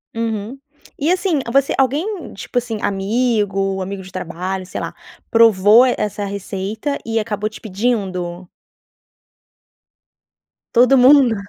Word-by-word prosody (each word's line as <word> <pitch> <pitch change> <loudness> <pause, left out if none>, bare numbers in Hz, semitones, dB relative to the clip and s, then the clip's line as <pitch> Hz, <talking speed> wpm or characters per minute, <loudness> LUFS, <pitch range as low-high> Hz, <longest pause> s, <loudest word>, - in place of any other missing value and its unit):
Uhum 225 +2 -3 0.4
e 300 +4 +1
assim 365 -4 +1
você 275 +2 +2
alguém, 305 - -1
tipo 205 - -6
assim, 235 -3 -1
amigo, 195 -2 0
amigo 195 +1 -6
de 185 0 -12
trabalho, 185 +1 -4
sei - - -6
lá, - - -5 0.3
provou 225 +1 +6
essa 210 -5 -1
receita 200 +7 -4
e 225 0 0
acabou 210 -1 -2
te 215 - -13
pedindo. 190 -5 -2 2.3
Todo 255 +3 +5
mundo. 255 -2 +6
215 Hz, 115 wpm, -19 LUFS, 195-250 Hz, 2.3 s, provou